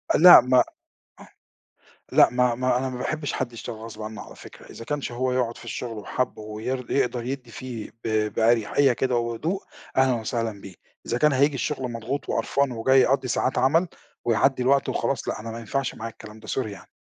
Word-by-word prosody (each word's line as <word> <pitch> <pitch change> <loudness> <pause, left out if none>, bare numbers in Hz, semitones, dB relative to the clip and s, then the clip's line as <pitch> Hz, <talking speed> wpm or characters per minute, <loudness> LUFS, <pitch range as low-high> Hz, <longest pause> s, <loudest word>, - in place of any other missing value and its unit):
لأ، 175 -3 +10
ما 125 0 +4
أ - - +6 1.5
لأ، - - +6
ما 125 -1 +2
ما 125 0 +1
أنا 130 0 -2
ما 125 - -6
باحبش 155 +2 -3
حد 120 -2 -3
يشتغل 115 0 -7
غصب 110 -1 -9
عنّه 110 0 -6
على - - -13
فكرة، - - -14
إذا 115 - -9
كانش 145 -3 -3
هو 125 +1 -1
يقعُد 120 -2 0
في - - -12
الشُغل 115 -3 -5
وحَابُّه 110 +1 -3
وير 115 +4 -5
يقدر 125 -3 0
يدّي 125 -2 -5
فيه 120 -3 -7
ب 110 -1 0
بأريحية 120 +4 +3
كده 125 +1 0
وهدوء، 120 - -2 0.3
أهلًا 130 -1 +4
وسهلًا 110 -3 -3
بيه، 95 -2 -11 0.3
إذا 120 - -1
كان 150 -1 +4
هييجي 140 +2 +3
الشُغل 130 -2 -3
مضغوط 115 +5 -4
وقرفان 140 -2 0
وجاي 130 +3 +4
يقضّي 130 0 +2
ساعات 125 +1 0
عمل 160 +8 +3 0.4
ويعدّي 125 +3 +2
الوقت 135 +2 +2
وخلاص، 135 -4 -1
لأ - - -3
أنا 115 +1 -6
ما 115 - -6
ينفعش 135 +4 -2
معايا 115 0 -6
الكلام 110 +1 -13
ده، 110 - -13
sorry 130 -4 -1
يعني. 100 -2 -10
125 Hz, 195 wpm, -25 LUFS, 115-135 Hz, 1.5 s, لأ